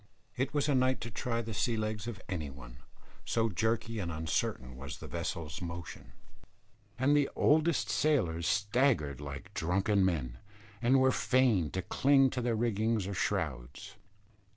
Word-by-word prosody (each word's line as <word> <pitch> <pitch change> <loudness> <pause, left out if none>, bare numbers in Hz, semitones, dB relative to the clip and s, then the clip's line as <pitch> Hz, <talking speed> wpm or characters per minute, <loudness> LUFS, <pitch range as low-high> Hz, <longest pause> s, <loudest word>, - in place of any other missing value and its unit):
It 135 +2 -1
was 145 -1 0
a 145 - +2
night 130 0 +2
to 115 - -5
try 115 +2 -2
the 110 0 -6
sea 115 +3 0
legs 110 0 -3
of 115 -5 -5
any 80 -6 -3
one, - - -11 0.5
so 115 -1 +1
jerky 110 +2 -1
and 85 -4 -3
uncertain 75 -5 -2
was 70 +2 -7
the - - -10
vessel's 85 -2 -4
motion; 85 -1 -7 0.8
and 140 +3 +3
the 145 -1 +3
oldest 155 +1 +3
sailors 90 - +1
staggered 105 - +1
like 70 -2 -8
drunken 95 +4 +1
men, 65 -10 -1 0.4
and 130 +3 +4
were 130 0 +4
fain 125 - +2
to 95 - -2
cling 135 +6 +4
to 125 - -2
rigging 110 -2 0
or 100 - -3
shrouds. 65 -7 -3
105 Hz, 150 wpm, -31 LUFS, 80-125 Hz, 0.8 s, and